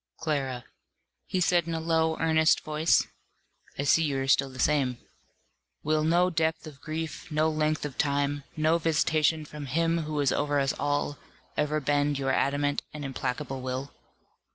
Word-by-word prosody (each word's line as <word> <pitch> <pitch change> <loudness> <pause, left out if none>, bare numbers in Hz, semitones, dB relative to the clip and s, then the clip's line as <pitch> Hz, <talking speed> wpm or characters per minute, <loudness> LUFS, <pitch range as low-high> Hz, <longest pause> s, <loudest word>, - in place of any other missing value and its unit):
"Clara," 135 -6 -2 0.6
he 185 - -1
said 175 -1 +2
in 165 - -2
a - - -1
low, 160 0 +1
earnest 160 -1 +3
voice, 155 +1 +2 0.7
"I 140 - -1
see 145 +4 +4
you 140 -3 0
are 135 - -3
still 135 0 +3
the 130 - -12
same. 130 -3 +1 0.9
Will 155 0 +1
no 175 +3 +3
depth 160 -1 0
of 145 -3 -11
grief, 160 +1 -5
no 155 +1 +2
length 155 -1 0
of 145 -2 -7
time, 145 0 0
no 160 +2 +3
visitation 155 -1 +1
from 150 -1 -8
Him 165 +5 +1
who 155 -2 -3
is 140 -3 +2
over 145 -1 +1
us 135 0 +1
all, 145 0 -1 0.4
ever 150 +1 0
bend 145 0 +1
your 135 -1 0
adamant 145 +2 +1
and 150 -2 -6
implacable 135 0 -3
will?" 130 +2 -4
150 Hz, 165 wpm, -28 LUFS, 140-160 Hz, 0.9 s, see